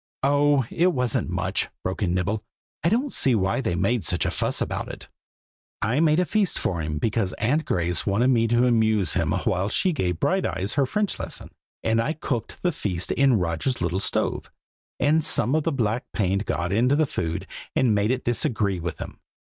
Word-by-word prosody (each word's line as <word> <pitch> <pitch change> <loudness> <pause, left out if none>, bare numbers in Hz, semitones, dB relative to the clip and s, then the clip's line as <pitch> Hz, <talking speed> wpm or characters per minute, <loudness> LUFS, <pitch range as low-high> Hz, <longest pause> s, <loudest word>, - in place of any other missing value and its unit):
"Oh! 145 -1 +3
it 180 +2 +2
wasn't 125 -8 0
much!" 90 +1 -1
broke 95 +3 -3
in 90 -3 +1
Nibble: 100 +4 -1 0.4
"I 165 - +3
don't 250 +7 0
see 130 -3 +2
why 95 +5 +1
they 100 -9 -1
made 115 +5 +1
such 90 - 0
a - - 0
fuss - - -1
about - - -3
it. - - -9 0.7
I 115 +7 +1
made 155 0 +4
a 180 - +2
feast 200 +3 +1
for 85 -3 -1
him, 75 -1 -3
because 105 +3 0
Aunt 140 +9 0
Grace 85 -1 0
wanted 110 +6 +2
me 115 -3 +3
to 120 +2 +3
amuse 110 -5 +2
him - - 0
while 95 +2 0
she 185 - +1
gave 90 - -1
Brighteyes 100 - 0
her 140 -2 +2
French 210 +7 -1
lesson; - - -5 0.3
and 115 0 +2
I 150 +7 -1
cooked 125 -7 -4
the 180 - +2
feast 95 - -2
in 135 -2 +4
Roger's 90 +8 -1
little 90 +1 -1
stove, - - -1 0.5
and 155 +4 +3
some 130 -3 +2
of 155 -1 +1
the 165 - +1
black 120 -2 -1
paint 100 0 0
got 90 +1 -1
into 125 +6 +3
the 155 +1 +3
food 80 - -3 0.3
and 120 -4 +3
made 105 +1 +1
it 130 +1 -1
disagree 110 - 0
with 85 0 -4
him. - - -8
115 Hz, 195 wpm, -24 LUFS, 95-145 Hz, 0.7 s, made